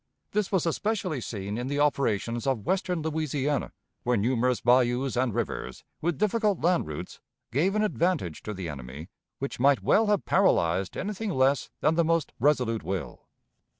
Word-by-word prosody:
This 210 -1 0
was 190 -4 +1
especially 185 - -1
seen 105 0 -4
in 125 - -3
the 145 +1 -1
operations 120 -4 0
of 120 -7 0
western 180 -3 0
Louisiana, 150 -3 -1 0.3
where 125 -1 +1
numerous 125 +3 +1
bayous 125 +2 +2
and 125 0 +1
rivers, 105 - -4 0.2
with 170 -2 0
difficult 215 -2 +1
land 175 - +2
routes, 75 -1 -7 0.3
gave 170 - +1
an 215 - +2
advantage 170 - 0
to 105 - -5
the 95 -2 -5
enemy 70 +3 -8 0.3
which 135 -2 -5
might 140 +2 +4
well 220 0 +4
have 205 -1 +1
paralyzed 95 - +2
anything 210 +2 -3
less 135 -5 +2
than 155 - +3
the 170 +1 +3
most 165 -1 0
resolute 125 -4 +2
will. 95 -2 -5
135 Hz, 160 wpm, -27 LUFS, 115-175 Hz, 0.3 s, might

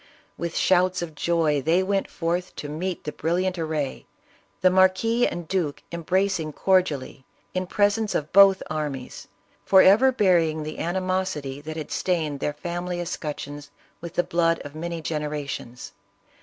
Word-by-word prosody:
"With 170 -1 -4
shouts 185 -1 +3
of 165 -2 -7
joy 155 -2 +1
they 170 +7 +2
went 195 +1 -1
forth 175 +1 -2
to 145 - -6
meet 175 +5 -4
the 150 - -4
brilliant 180 +4 -1
array, 155 -4 -3 0.5
the 185 - +5
marquis 190 +6 +3
and 175 -2 -5
duke 170 -6 -2
embracing 170 -1 0
cordially, 160 -9 0 0.3
in 185 0 -2
presence 205 +2 +1
of 150 0 -2
both 195 -1 +7
armies, 145 -5 -5 0.4
forever 200 - +6
burying 170 -9 +2
the 155 +1 -6
animosity 185 -6 -2
that 155 +1 -7
had 155 - -6
stained 160 -6 -1
their 145 - -1
family 175 +2 -4
escutcheons 145 -4 -5 0.3
with 170 0 -8
the 175 - +2
blood 170 -1 +1
of 145 - -8
many 165 +1 -5
generations. 150 -6 -4
170 Hz, 140 wpm, -24 LUFS, 150-185 Hz, 0.5 s, both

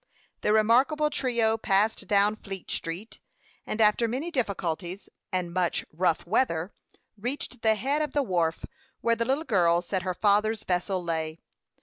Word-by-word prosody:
The - - +1
remarkable 255 +8 +3
trio 235 -5 +1
passed 210 +2 +1
down 205 0 +3
Fleet 195 -3 -8
Street, 175 +7 -5 0.5
and, 215 - -3
after 220 +2 +4
many 270 +9 -3
difficulties 190 - -3 0.2
and 180 -2 -2
much 180 -1 0
"rough 170 0 +1
weather," 180 -3 0 0.5
reached 245 +1 -4
the 220 -1 +4
head 275 +8 0
of 300 -3 -2
the 290 - +2
wharf, 170 -7 0 0.4
where 230 0 +2
the 230 0 -1
little 270 +5 0
girl 175 - +3
said 185 +1 -2
her 185 0 -3
father's 215 +2 +2
vessel 180 0 -1
lay. 160 -1 -2
210 Hz, 150 wpm, -27 LUFS, 180-235 Hz, 0.5 s, after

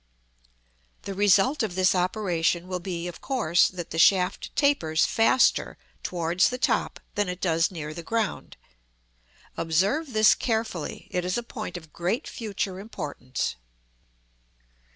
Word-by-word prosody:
The 200 - -5
result 205 +8 +3
of 210 -6 -2
this 185 0 +3
operation 180 -2 0
will 185 -1 -3
be 175 -1 -4
of 175 - -8
course 220 - +2
that 175 -2 -7
the 160 - -2
shaft 180 +3 +3
tapers 275 - +2
faster 230 +3 +3 0.2
towards 175 +1 +1
the 250 - -4
top - - 0
than 205 -2 0
it 180 0 -4
does 165 -2 +2
near 155 -4 -6
the 170 - -7
ground. 225 +4 -3 1.0
Observe 200 - 0
this 215 0 +6
carefully; 220 - -3
it 180 - -1
is 180 +3 -1
a 240 - -2
point 215 -6 -6
of 160 -3 -13
great 180 +7 -2
future 200 -4 -4
importance. 145 - -4
185 Hz, 135 wpm, -26 LUFS, 170-215 Hz, 1.0 s, this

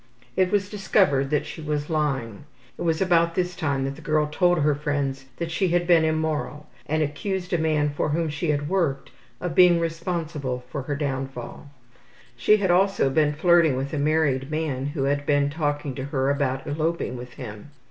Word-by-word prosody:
It 185 -1 +2
was 200 -2 +1
discovered 190 -9 +2
that 150 -1 0
she - - -8
was 150 -1 -2
lying. 140 - -2 0.3
It - - -10
was 165 +1 +1
about 170 -2 +2
this 180 -1 -1
time 140 -4 -1
that 135 +1 -3
the 160 - -12
girl 155 0 +1
told 175 +4 +2
her 150 0 +3
friends 140 -2 -2
that 170 -1 -3
she 190 +3 +1
had 175 0 +1
been 170 -2 +5
immoral, 155 -1 -1 0.2
and 155 +1 +1
accused 180 +5 -3
a 175 - +2
man 155 -2 +1
for 145 - -1
whom 165 +2 0
she 150 +2 -3
had 145 0 0
worked 160 -7 -1 0.3
of 180 -2 -3
being 175 -1 +6
responsible 165 -6 -3
for 140 - -3
her 145 +2 -3
downfall. 135 -1 -5 0.7
She 210 - +4
had 190 -3 +1
also 185 -6 +3
been 150 +1 +2
flirting 165 -3 +4
with 135 +3 -3
a 150 - -1
married 145 -3 +1
man 150 -4 -2
who 145 -1 -2
had 145 +1 0
been 145 -1 +2
talking 145 -2 -2
to 130 0 -5
her 140 -1 0
about 135 -2 -1
eloping 155 -2 -2
with 125 0 -8
him. 110 -1 -9
150 Hz, 190 wpm, -24 LUFS, 140-170 Hz, 0.7 s, being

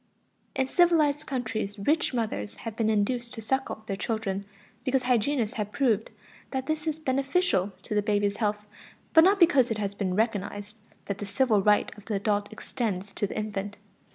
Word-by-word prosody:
In 265 - +1
civilized 305 -3 +3
countries 220 -6 -3
rich 300 +11 +1
mothers 210 - -2
have 225 -2 -4
been 225 -1 +1
induced 235 +3 0
to 225 - -6
suckle 265 -2 -1
their 195 - -2
children 200 -1 -2 0.4
because 260 0 +1
hygienists 245 -1 +1
have 210 -1 -2
proved 225 -5 +1 0.4
that 265 -1 -3
this 310 +1 -2
is 310 -1 0
beneficial 275 - +1
to - - -5
the 210 - +3
baby's 205 -1 +1
health, 210 -1 -1 0.5
but 320 - +8
not 390 +3 +5
because 305 -8 +5
it 225 - -1
has 200 -1 -2
been 190 -3 -2
recognized 205 -1 -1 0.3
that 200 - -4
the 205 - -4
"civil 210 0 +2
right" 210 +1 +3
of 205 - -17
the 215 - -2
adult 205 +1 0
extends 205 -3 -4
to 205 - -1
the - - -6
infant. 205 -1 -3
220 Hz, 180 wpm, -27 LUFS, 205-265 Hz, 0.5 s, but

